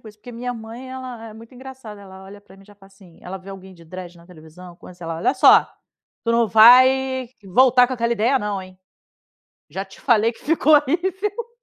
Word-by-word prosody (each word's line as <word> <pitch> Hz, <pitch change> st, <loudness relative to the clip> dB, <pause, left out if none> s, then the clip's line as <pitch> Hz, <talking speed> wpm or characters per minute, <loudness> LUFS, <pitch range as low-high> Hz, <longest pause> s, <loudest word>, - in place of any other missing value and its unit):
com 220 Hz, -, -14 dB
isso, 210 Hz, -, -16 dB
porque 245 Hz, -, -13 dB
minha 245 Hz, +1 st, -6 dB
mãe, 230 Hz, +3 st, -10 dB
ela 255 Hz, -3 st, -9 dB
é 215 Hz, -, -13 dB
muito 230 Hz, +3 st, -15 dB
engraçada, 255 Hz, -5 st, -12 dB
ela 190 Hz, -1 st, -14 dB
olha 200 Hz, +1 st, -13 dB
pra 200 Hz, -, -20 dB
mim 195 Hz, -, -19 dB
e -, -, -23 dB
já 205 Hz, -, -18 dB
fala 195 Hz, -1 st, -20 dB
assim 190 Hz, -3 st, -21 dB
ela 185 Hz, +2 st, -8 dB
vê 190 Hz, +1 st, -13 dB
alguém 190 Hz, -1 st, -12 dB
de 170 Hz, -1 st, -18 dB
dread 180 Hz, +1 st, -10 dB
na 170 Hz, -, -18 dB
televisão 175 Hz, +1 st, -15 dB
co 180 Hz, -, -14 dB
sei 175 Hz, -1 st, -11 dB
lá: 165 Hz, 0 st, -5 dB
"Olha 165 Hz, -, -1 dB
só, -, -, +5 dB, 0.6 s
tu 230 Hz, -, 0 dB
não 230 Hz, -1 st, +1 dB
vai 255 Hz, +3 st, +5 dB, 0.2 s
voltar 250 Hz, +5 st, +4 dB
com 255 Hz, -, -7 dB
aquela 235 Hz, -1 st, -1 dB
ideia 235 Hz, +5 st, +1 dB
não, 205 Hz, -4 st, -4 dB
hein. 185 Hz, 0 st, -16 dB, 0.9 s
Já 195 Hz, +1 st, -6 dB
te 195 Hz, -, -18 dB
falei 230 Hz, -2 st, +2 dB
que -, -, -20 dB
ficou 310 Hz, 0 st, +2 dB
horrível". 380 Hz, -, -2 dB
220 Hz, 225 wpm, -20 LUFS, 190-255 Hz, 0.9 s, só